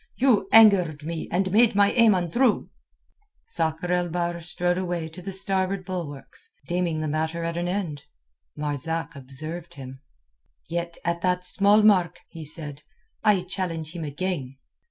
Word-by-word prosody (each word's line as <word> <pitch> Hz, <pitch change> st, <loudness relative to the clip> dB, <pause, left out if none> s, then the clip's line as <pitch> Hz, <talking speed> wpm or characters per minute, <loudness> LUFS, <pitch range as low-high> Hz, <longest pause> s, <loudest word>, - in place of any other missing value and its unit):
"You 240 Hz, -7 st, +2 dB
angered 190 Hz, -9 st, +6 dB
me 165 Hz, +1 st, -5 dB
and 185 Hz, +2 st, 0 dB
made 220 Hz, +1 st, +4 dB
my 200 Hz, 0 st, +4 dB
aim 230 Hz, -4 st, +5 dB
untrue." 205 Hz, +7 st, +1 dB, 0.7 s
Sakr 165 Hz, +2 st, -2 dB
el 175 Hz, -1 st, 0 dB
Bahr 170 Hz, 0 st, -2 dB
strode 175 Hz, +1 st, -1 dB
away 175 Hz, -3 st, -3 dB
to 165 Hz, +3 st, -11 dB
the 195 Hz, +2 st, -6 dB
starboard 190 Hz, 0 st, 0 dB
bulwarks, 170 Hz, -7 st, -7 dB, 0.2 s
deeming 175 Hz, -3 st, -1 dB
the 155 Hz, -, -2 dB
matter 160 Hz, +2 st, -2 dB
at 165 Hz, 0 st, -3 dB
an 175 Hz, +1 st, -2 dB
end. 175 Hz, -7 st, -3 dB, 0.5 s
Marzak 160 Hz, +3 st, -2 dB
observed 155 Hz, +6 st, -7 dB
him. 135 Hz, -1 st, -10 dB, 0.7 s
"Yet 170 Hz, 0 st, -4 dB
at 170 Hz, 0 st, -1 dB
that 180 Hz, 0 st, 0 dB
small 200 Hz, +3 st, +4 dB
mark," 180 Hz, -5 st, +4 dB
he 165 Hz, -2 st, -9 dB
said, 150 Hz, -1 st, -3 dB, 0.4 s
"I 205 Hz, -4 st, +3 dB
challenge 175 Hz, -4 st, -4 dB
him 170 Hz, -, -4 dB
again." 145 Hz, -3 st, -4 dB
175 Hz, 150 wpm, -25 LUFS, 160-190 Hz, 0.7 s, angered